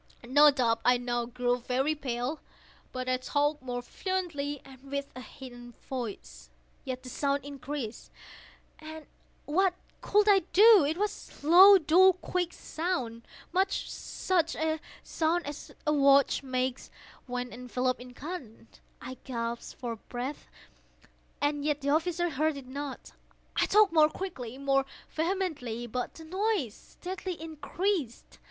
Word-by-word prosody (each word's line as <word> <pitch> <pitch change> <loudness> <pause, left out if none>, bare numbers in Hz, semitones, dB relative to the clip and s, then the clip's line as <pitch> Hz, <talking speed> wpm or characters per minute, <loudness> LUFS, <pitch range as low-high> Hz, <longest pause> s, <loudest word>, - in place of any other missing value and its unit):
No 290 +4 +7
doubt 235 -5 +1
I 250 0 +5
now 240 -1 -2
grew 245 0 0
very 260 +5 0
pale;—but 255 -1 -6
I 255 0 +2
talked 290 +3 0
more 245 -1 -4
fluently, 310 -4 -3
and 265 -1 -14
with 280 0 -3
a 255 - -7
heightened 245 -3 -11
voice. 130 - -7 0.3
Yet 255 -1 -5
the 255 - -8
sound 280 +1 -1
increased—and 290 +3 -9 0.4
what 365 +4 +2 0.3
could 420 0 +3
I 400 -2 +7
do? 420 -2 +8
It 310 +3 -1
was 415 -6 -4
a - - -5
low, 380 +4 +10
dull, 370 +3 +6
quick 360 -1 -2
sound—much 340 +4 -3
such 345 -3 -1
a 315 0 0 0.2
sound 335 +2 0
as 290 0 -7
a 300 - +2
watch 280 -1 +5
makes 255 -1 -2 0.4
when 250 0 -4
enveloped 250 +1 -2
in 250 0 -11
cotton. 260 -8 -8 0.3
I 260 0 -8
gasped 235 -2 -5
for 235 -2 -4
breath—and 285 +3 -7
yet 295 -1 0
the 280 - -1
officers 345 +3 +1
heard 305 +2 +1
it 275 - -9
not. 280 +1 -6 0.4
I - - +2
talked 420 -4 +5
more 310 -2 +6
quickly—more 275 -6 -2 0.3
vehemently; 315 - -2
but 245 +2 -4
the 325 - -10
noise 375 - 0
steadily 365 - -7
increased. 320 - -3
280 Hz, 130 wpm, -29 LUFS, 250-330 Hz, 0.4 s, low